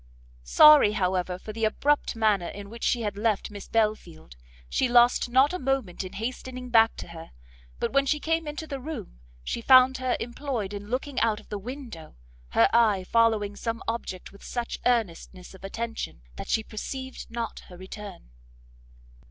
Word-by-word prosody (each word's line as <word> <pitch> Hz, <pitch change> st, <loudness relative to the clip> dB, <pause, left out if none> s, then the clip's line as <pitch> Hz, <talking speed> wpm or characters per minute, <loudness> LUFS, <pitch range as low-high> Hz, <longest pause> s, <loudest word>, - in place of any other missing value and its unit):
Sorry, 210 Hz, -, +7 dB
however, 185 Hz, -2 st, -1 dB
for 215 Hz, +3 st, -9 dB
the 225 Hz, +1 st, -5 dB
abrupt 285 Hz, +6 st, +1 dB
manner 210 Hz, -5 st, +2 dB
in 200 Hz, 0 st, -9 dB
which 230 Hz, 0 st, -9 dB
she 240 Hz, -2 st, +1 dB
had 205 Hz, -1 st, -2 dB
left 215 Hz, -1 st, 0 dB
Miss 205 Hz, -1 st, -9 dB
Belfield, 210 Hz, -, -2 dB, 0.3 s
she 255 Hz, -, 0 dB
lost 240 Hz, 0 st, +4 dB
not 265 Hz, +6 st, +4 dB
a 365 Hz, -, -3 dB
moment 260 Hz, -9 st, -1 dB
in 185 Hz, -, -8 dB
hastening 250 Hz, +2 st, -5 dB
back 225 Hz, -1 st, +5 dB
to -, -, -8 dB
her; 165 Hz, -1 st, -11 dB, 0.5 s
but -, -, -2 dB
when 275 Hz, 0 st, +3 dB
she 300 Hz, +2 st, +1 dB
came 325 Hz, +1 st, -1 dB
into 295 Hz, +2 st, -5 dB
the 280 Hz, -3 st, -5 dB
room, 260 Hz, -, -7 dB, 0.2 s
she 235 Hz, -, -3 dB
found 255 Hz, +1 st, +6 dB
her 255 Hz, -1 st, 0 dB
employed 240 Hz, -4 st, -4 dB
in 205 Hz, 0 st, -7 dB
looking 255 Hz, +4 st, -2 dB
out 220 Hz, -2 st, +1 dB
of -, -, -18 dB
the 205 Hz, -, -4 dB
window, 235 Hz, -, -9 dB, 0.3 s
her -, -, +4 dB
eye 215 Hz, -5 st, +4 dB
following 215 Hz, -1 st, +2 dB
some 230 Hz, +2 st, -4 dB
object 225 Hz, -5 st, -4 dB
with 200 Hz, -, -16 dB
such 240 Hz, -1 st, -4 dB
earnestness 190 Hz, -6 st, -2 dB
of 190 Hz, -, -15 dB
attention, 225 Hz, -, -5 dB
that -, -, -8 dB
she 220 Hz, -, +1 dB
perceived 260 Hz, +5 st, -7 dB
not 230 Hz, -2 st, -4 dB
her 180 Hz, -, -12 dB
return. 190 Hz, -, -10 dB
225 Hz, 175 wpm, -26 LUFS, 200-255 Hz, 0.5 s, Sorry